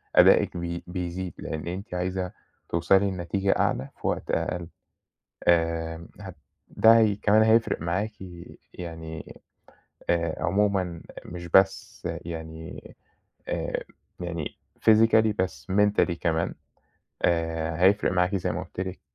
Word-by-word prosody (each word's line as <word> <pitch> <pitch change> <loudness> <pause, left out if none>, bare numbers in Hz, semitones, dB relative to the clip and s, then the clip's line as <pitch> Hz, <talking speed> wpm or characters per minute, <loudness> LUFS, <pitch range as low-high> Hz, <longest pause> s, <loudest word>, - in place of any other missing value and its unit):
أدائِك - - +6
بي 85 0 -4
بيزيد، 90 0 -4
لإن 80 +1 -5
أنتِ 95 +5 -5
عايزة 90 0 -2 0.4
توصلي 95 +4 +3
لنتيجة 95 +2 -1
أعلى 65 +2 0
في - - -2
وقت - - -2
أقل. 90 -1 -1 0.8
آآ 80 -1 +1
هت - - -8 0.3
ده 115 +1 +6
هي 110 -2 +3
كمان 105 +1 +4
هيفرق 110 -3 +3
معاكِ 95 +6 -1 0.6
يعني 80 -2 -8 0.8
آآ 85 -2 0
عمومًا 95 -3 +1 0.2
مش 85 0 -7
بس 95 +2 +2 0.2
يعني 80 -1 -8 0.5
آآ، - - -2 0.4
يعني 85 -3 -4 0.2
Physically 110 0 +5
بس 95 0 -2
Mentally 105 -2 +3
كمان، 85 -1 0 0.7
آآ 80 -1 0
هيفرق 100 +1 +4
معاكِ 90 +2 +2
زي 90 - -1
ما - - -3
قُلت - - -8
لِك 95 0 -4
90 Hz, 120 wpm, -26 LUFS, 85-100 Hz, 0.8 s, أدائِك